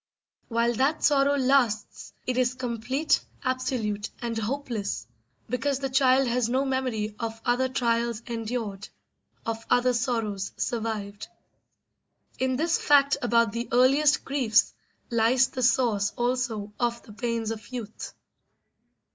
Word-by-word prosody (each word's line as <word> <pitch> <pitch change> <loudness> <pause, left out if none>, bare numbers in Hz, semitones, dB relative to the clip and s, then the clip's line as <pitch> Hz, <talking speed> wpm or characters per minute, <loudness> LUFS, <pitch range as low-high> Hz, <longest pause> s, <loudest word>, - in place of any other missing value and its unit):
While 235 0 +1
that 285 +5 +1
sorrow 285 -1 +4
lasts 255 -5 +1
it 255 - -1
is 255 0 +1
complete, 255 +4 0 0.2
absolute, 255 -5 -1
and 235 -1 -3
hopeless, 225 -2 -3 0.4
because 265 +3 -1
the 270 -1 -3
child 265 0 +4
has 240 -1 +1
no 260 +3 +1
memory 255 -6 -1
of 225 -1 -4
other 250 +2 +2
trials 235 -2 0
endured, 225 -4 -4 0.6
of 225 0 -3
other 250 0 +3
sorrows 225 -5 -2
survived. 215 -3 -3 1.1
In 260 0 +1
this 330 +5 +1
fact 280 -1 +4
about 235 -2 +3
the 235 +2 -4
earliest 275 +4 +4
griefs 255 -5 +2 0.4
lies 235 +3 +3
the 255 - -5
source 230 -4 +2
also 240 -4 -1
of 235 -1 -1
the 210 - -13
pains 230 0 -2
of 220 -1 -7
youth. 225 -4 -7
240 Hz, 125 wpm, -26 LUFS, 225-260 Hz, 1.1 s, sorrow